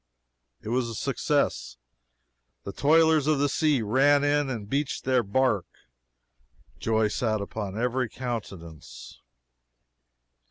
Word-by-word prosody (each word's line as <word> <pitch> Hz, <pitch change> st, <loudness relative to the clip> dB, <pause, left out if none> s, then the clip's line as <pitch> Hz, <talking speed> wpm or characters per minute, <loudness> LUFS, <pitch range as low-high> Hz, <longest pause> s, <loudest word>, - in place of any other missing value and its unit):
It -, -, -6 dB
was 120 Hz, 0 st, 0 dB
a 115 Hz, -, -6 dB
success. -, -, -1 dB, 0.9 s
The 100 Hz, -, -7 dB
toilers 160 Hz, +1 st, +3 dB
of 155 Hz, -1 st, +3 dB
the 145 Hz, +1 st, +2 dB
sea 145 Hz, -3 st, +1 dB
ran 140 Hz, +6 st, +3 dB
in 145 Hz, -1 st, +1 dB
and 110 Hz, -6 st, -5 dB
beached 140 Hz, +4 st, -2 dB
their 130 Hz, -1 st, +2 dB
barque. 105 Hz, -1 st, -1 dB, 1.0 s
Joy 110 Hz, -1 st, +1 dB
sat 110 Hz, -1 st, -1 dB
upon 100 Hz, 0 st, -5 dB
every 125 Hz, 0 st, -1 dB
countenance. 100 Hz, -, -8 dB
125 Hz, 115 wpm, -26 LUFS, 105-145 Hz, 1.0 s, toilers